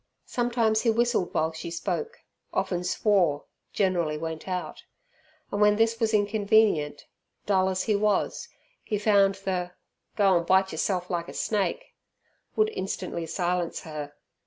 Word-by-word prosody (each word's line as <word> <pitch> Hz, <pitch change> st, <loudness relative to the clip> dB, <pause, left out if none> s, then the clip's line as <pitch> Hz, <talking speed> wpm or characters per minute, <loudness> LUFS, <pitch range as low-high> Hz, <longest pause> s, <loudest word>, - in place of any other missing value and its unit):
Sometimes 235 Hz, -3 st, +1 dB
he 235 Hz, -, +2 dB
whistled 230 Hz, -4 st, +1 dB
while 160 Hz, +1 st, 0 dB
she 160 Hz, +1 st, -7 dB
spoke, 455 Hz, -, -4 dB, 0.3 s
often 190 Hz, -2 st, -1 dB
swore, 180 Hz, -5 st, +2 dB, 0.3 s
generally 175 Hz, -6 st, 0 dB
went 160 Hz, +1 st, -5 dB
out, 185 Hz, -1 st, -4 dB, 0.7 s
and 205 Hz, -, -1 dB
when 210 Hz, 0 st, +5 dB
this 225 Hz, +1 st, +2 dB
was 225 Hz, -2 st, +1 dB
inconvenient, 205 Hz, -7 st, +2 dB, 0.4 s
dull 190 Hz, -2 st, +2 dB
as 185 Hz, 0 st, -1 dB
he 215 Hz, -, +1 dB
was, 210 Hz, -, 0 dB, 0.4 s
he 210 Hz, -, -2 dB
found 200 Hz, -2 st, +4 dB
the 185 Hz, -2 st, -3 dB, 0.4 s
"Go 195 Hz, -3 st, +4 dB
and 170 Hz, 0 st, -2 dB
bite 190 Hz, 0 st, +4 dB
yerself 180 Hz, +3 st, -1 dB
like 170 Hz, -1 st, -2 dB
a -, -, -8 dB
snake", 220 Hz, -, -1 dB, 0.6 s
would 435 Hz, 0 st, +3 dB
instantly 185 Hz, -, -4 dB
silence 175 Hz, +1 st, -1 dB
her. 150 Hz, -2 st, -7 dB
190 Hz, 140 wpm, -27 LUFS, 175-215 Hz, 0.7 s, when